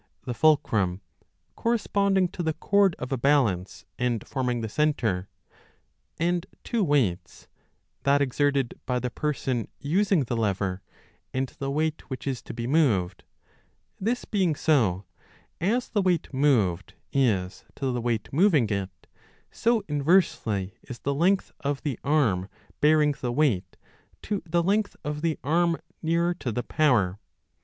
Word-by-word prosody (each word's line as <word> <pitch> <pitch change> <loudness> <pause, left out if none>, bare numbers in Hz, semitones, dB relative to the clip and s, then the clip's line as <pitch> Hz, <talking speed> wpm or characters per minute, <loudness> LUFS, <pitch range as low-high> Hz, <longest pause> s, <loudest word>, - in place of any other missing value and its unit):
the 125 - -2
fulcrum 115 - +2 0.6
corresponding 200 -5 +1
to 180 0 -6
the 160 -2 -1
cord 200 +1 +3
of 125 - -6
a 135 - -1
balance 120 -10 +1
and 120 -2 0
forming 125 -3 -1
the 110 - -2
centre 110 -9 0 0.9
and 175 +2 0 0.2
two 235 -4 0
weights, 110 - 0 0.5
that 140 +1 +3
exerted 140 -1 +1
by 125 - +1
the 125 0 -2
person 130 -5 -2
using 180 +3 +2
the 120 -1 -3
lever 100 -4 -1 0.5
and 130 0 0
the 135 - -2
weight 155 +2 -2
which 130 - -6
is 135 -3 -2
to - - -9
be 115 0 -5
moved; 120 - +1 0.7
this 235 +5 -1
being 185 -7 +1
so, 110 - +2 0.5
as 230 +9 +1
the 210 - +1
weight 180 -6 0
moved 110 -11 +1 0.2
is 105 -9 +1
to 135 -2 -1
the 125 -1 -2
weight 115 -3 -1
moving 155 - +4
it, 100 -2 -1 0.6
so, 235 -1 +1
8so - - -25
b 150 - -6
inversely, 140 - +2
is 125 - -9
the 140 +6 -2
length 185 +7 +2
of 140 -1 -2
the 140 -6 -2
arm 120 -11 +1 0.3
bearing 150 -1 +4
the 125 - -1
weight 120 - 0 0.5
to 205 -2 -2
the 170 +1 +1
length 205 +3 +1
of 150 0 -3
the 165 -1 0
arm 170 +2 +2 0.2
nearer 170 +2 +1
to 130 -8 -4
the 120 +3 -2
power. 110 - +2
140 Hz, 150 wpm, -26 LUFS, 115-165 Hz, 0.9 s, moving